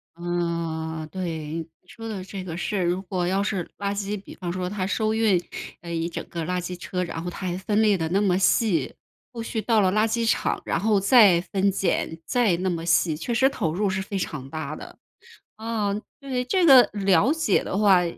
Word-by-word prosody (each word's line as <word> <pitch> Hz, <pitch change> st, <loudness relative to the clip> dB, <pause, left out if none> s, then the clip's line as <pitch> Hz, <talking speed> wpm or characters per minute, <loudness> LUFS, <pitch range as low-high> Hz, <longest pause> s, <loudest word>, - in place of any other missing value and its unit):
啊 170 Hz, -2 st, -3 dB
对， 160 Hz, -2 st, -4 dB, 0.2 s
你 180 Hz, -, -37 dB
说 225 Hz, +3 st, -9 dB
的 205 Hz, -4 st, -5 dB
这 190 Hz, 0 st, -7 dB
个 170 Hz, -3 st, -6 dB
事， 190 Hz, +2 st, -1 dB
如 175 Hz, +2 st, 0 dB
果 180 Hz, -1 st, -2 dB
要 190 Hz, +2 st, +1 dB
是 195 Hz, -4 st, -2 dB
垃 200 Hz, 0 st, -2 dB
圾， 200 Hz, 0 st, -3 dB
比 -, -, -12 dB
方 175 Hz, -2 st, -4 dB
说 180 Hz, 0 st, -3 dB
它 190 Hz, -1 st, -2 dB
收 215 Hz, +3 st, 0 dB
运， 220 Hz, -5 st, +3 dB, 0.4 s
呃， 170 Hz, -, -8 dB
一 165 Hz, +1 st, -1 dB
整 170 Hz, -, -6 dB
个 170 Hz, -1 st, -4 dB
垃 180 Hz, +1 st, -1 dB
圾 180 Hz, 0 st, -5 dB
车， 180 Hz, +1 st, -3 dB
然 165 Hz, -1 st, -5 dB
后 180 Hz, -, -3 dB
它 185 Hz, +1 st, -5 dB
还 175 Hz, 0 st, -2 dB
分 205 Hz, +3 st, 0 dB
类 210 Hz, -3 st, +4 dB
得 160 Hz, -2 st, -1 dB
那 190 Hz, +4 st, +2 dB
么 185 Hz, -3 st, +2 dB
细， 190 Hz, -, +2 dB, 0.4 s
后 235 Hz, -, -6 dB
续 225 Hz, -1 st, -3 dB
到 225 Hz, +1 st, +2 dB
了 190 Hz, -3 st, +3 dB
垃 215 Hz, +2 st, +3 dB
圾 230 Hz, 0 st, 0 dB
场， -, -, 0 dB
然 -, -, 0 dB
后 210 Hz, -1 st, +2 dB
再 200 Hz, -4 st, +6 dB
分 195 Hz, 0 st, +3 dB
拣 175 Hz, -3 st, -1 dB
再 235 Hz, -9 st, +2 dB
那 185 Hz, +2 st, -1 dB
么 165 Hz, -2 st, -3 dB
细， 165 Hz, -1 st, +3 dB
确 170 Hz, +10 st, -3 dB
实 265 Hz, +3 st, +4 dB
投 160 Hz, -, -2 dB
入 200 Hz, +3 st, 0 dB
是 190 Hz, 0 st, -1 dB
非 195 Hz, +1 st, -4 dB
常 135 Hz, -6 st, -5 dB
大 155 Hz, -1 st, -5 dB
的。 -, -, -11 dB, 0.6 s
啊， 220 Hz, -2 st, -2 dB, 0.3 s
对， 260 Hz, -3 st, -2 dB
这 365 Hz, +8 st, +1 dB
个 270 Hz, -6 st, +8 dB
了 200 Hz, -, +3 dB
解 320 Hz, -, +1 dB
的 -, -, -3 dB
话， 195 Hz, -3 st, +5 dB
190 Hz, 230 characters per minute, -24 LUFS, 170-210 Hz, 0.6 s, 个